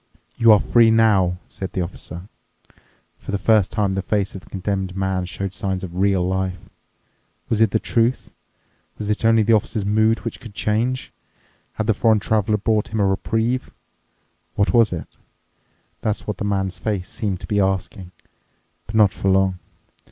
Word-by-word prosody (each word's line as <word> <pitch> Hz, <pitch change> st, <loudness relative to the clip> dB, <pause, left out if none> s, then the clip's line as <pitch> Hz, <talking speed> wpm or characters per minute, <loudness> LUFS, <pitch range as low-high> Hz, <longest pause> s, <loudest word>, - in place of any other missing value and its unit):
"You 115 Hz, -1 st, +5 dB
are 105 Hz, -, +7 dB
free 115 Hz, +2 st, +4 dB
now," 105 Hz, -6 st, +3 dB
said 95 Hz, -, -7 dB
the 90 Hz, -, -1 dB
Officer. 85 Hz, 0 st, -8 dB, 0.9 s
For -, -, -14 dB
the 100 Hz, -, 0 dB
first 105 Hz, -1 st, +3 dB
time 100 Hz, -3 st, 0 dB
the 95 Hz, -, -1 dB
face 100 Hz, 0 st, -1 dB
of 95 Hz, -, -8 dB
the -, -, -19 dB
Condemned 95 Hz, -1 st, -3 dB
Man 95 Hz, -1 st, -1 dB
showed 95 Hz, +2 st, -5 dB
signs 95 Hz, 0 st, -3 dB
of 90 Hz, -2 st, -7 dB
real 95 Hz, -1 st, +2 dB
life. 95 Hz, -1 st, -3 dB, 0.8 s
Was 110 Hz, -1 st, +1 dB
it 110 Hz, -, +5 dB
the 110 Hz, -, +1 dB
truth? 115 Hz, +3 st, 0 dB, 0.6 s
Was 105 Hz, 0 st, -3 dB
it 105 Hz, -, -2 dB
only 115 Hz, -1 st, +4 dB
the 115 Hz, -, +3 dB
Officer's 105 Hz, -1 st, 0 dB
mood, 110 Hz, +2 st, +2 dB
which -, -, -4 dB
could 110 Hz, -4 st, -12 dB
change? 115 Hz, +5 st, -1 dB, 0.6 s
Had 110 Hz, -, -3 dB
the 110 Hz, -, +3 dB
foreign 110 Hz, +1 st, +3 dB
Traveler 105 Hz, 0 st, +1 dB
brought 110 Hz, 0 st, 0 dB
him 110 Hz, -, -3 dB
a 100 Hz, -, +3 dB
reprieve? 115 Hz, +6 st, 0 dB, 0.9 s
What 100 Hz, -, +1 dB
was 115 Hz, -3 st, +5 dB
it? 85 Hz, -3 st, -4 dB, 1.0 s
That's 110 Hz, -1 st, -2 dB
what 105 Hz, -, -4 dB
the -, -, -2 dB
man's 95 Hz, -3 st, -1 dB
face 95 Hz, -1 st, -2 dB
seemed 100 Hz, -7 st, -3 dB
to -, -, -6 dB
be 105 Hz, -, 0 dB
asking. 95 Hz, -1 st, -2 dB, 0.8 s
But 110 Hz, -, -7 dB
not 105 Hz, -3 st, +5 dB
for 95 Hz, -, -1 dB
long. 95 Hz, -1 st, +2 dB
100 Hz, 175 wpm, -21 LUFS, 95-110 Hz, 1.0 s, are